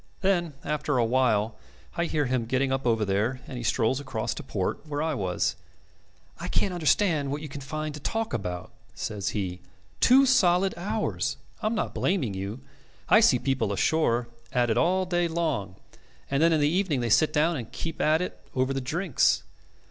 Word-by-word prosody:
Then 175 -5 +1
after 150 -2 -1
a 120 - +3
while 115 -3 +1 0.4
I 170 -1 0
hear 150 -3 0
him 125 -3 -1
getting 130 +2 +1
up 135 -1 -1
over 115 -2 +2
there, 105 +6 0
and 130 - -8
he 120 - -5
strolls 115 +3 +1
across 125 -6 -3
to - - -7
port, - - -3
where 145 -1 -3
I 160 -1 0
was. 95 -9 -1 0.8
'I - - -4
can't 190 - 0
understand 160 -3 +2
what 145 +2 -3
you - - -5
can 140 0 -8
find 155 +2 -4
to 150 - -7
talk 225 - -2
about,' 90 -5 -4 0.2
says 100 -2 -3
he. 95 -4 -3 0.4
'Two 265 +3 +6
solid 190 -7 +4
hours. 205 +5 -2 0.2
I - - 0
am 225 - 0
not 215 - -2
blaming 155 - 0
you. 100 +6 -5 0.5
I 215 - +7
see 140 - +5
people 125 -5 0
ashore 120 +1 +1 0.2
at 120 -2 +2
it - - +2
all 185 +6 +2
day 175 -1 +1
long, 155 - -2 0.6
and 140 +1 +2
then 165 +1 +5
in 160 - +3
the 145 - +4
evening 165 -5 +1
they 120 - -1
sit 155 +8 +4
down 160 +3 +2
and 120 -6 -6
keep 165 - -5
at 155 +3 +3
it - - -6 0.2
over 130 +1 +1
the 135 - -2
drinks. 160 +4 +1
140 Hz, 195 wpm, -27 LUFS, 120-170 Hz, 0.8 s, I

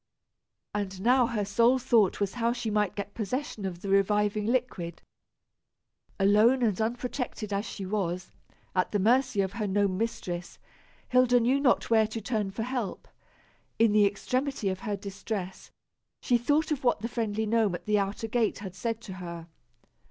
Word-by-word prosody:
And 195 -2 -3
now 245 +2 +4
her 215 -4 -1
sole 230 +5 +4
thought 235 -6 +3
was 200 -1 -1
how 235 -1 0
she 240 -3 -3
might 210 -2 +1
get 200 0 -5
possession 225 -1 -3
of 175 -2 -5
the 200 - -4
reviving 205 +1 +2
liquid. 225 -9 -2 1.2
Alone 215 +6 +4
and 215 -3 +1
unprotected 240 -2 -3
as 200 +2 -1
she 195 - -6
was, 185 -3 -2 0.4
at 185 - +1
the 205 - +1
mercy 230 +1 +3
of 190 -1 -1
her 215 -2 -2
gnome 195 -1 +1
mistress, 180 -6 -4 0.5
Hilda 250 -1 +5
knew 250 +4 +2
not 255 -4 +2
where 220 -1 +5
to 220 +1 -5
turn 215 -2 -2
for 210 +3 -4
help. 245 -5 -4 0.7
In 225 -1 +4
the 210 -1 +5
extremity 255 +2 -1
of 185 -1 -3
her 210 -2 -2
distress, 195 -1 -6 0.5
she 245 - +1
thought 295 +6 +1
of 290 -3 -1
what 245 -4 +2
the 230 - -2
friendly 220 -2 -2
gnome 215 -4 +2
at - - -9
the 210 -1 +2
outer 200 +3 -2
gate 225 -1 +1
had 195 -3 -7
said 225 +4 -3
to 195 - -8
her. 170 -2 -7
215 Hz, 170 wpm, -28 LUFS, 195-240 Hz, 1.2 s, Hilda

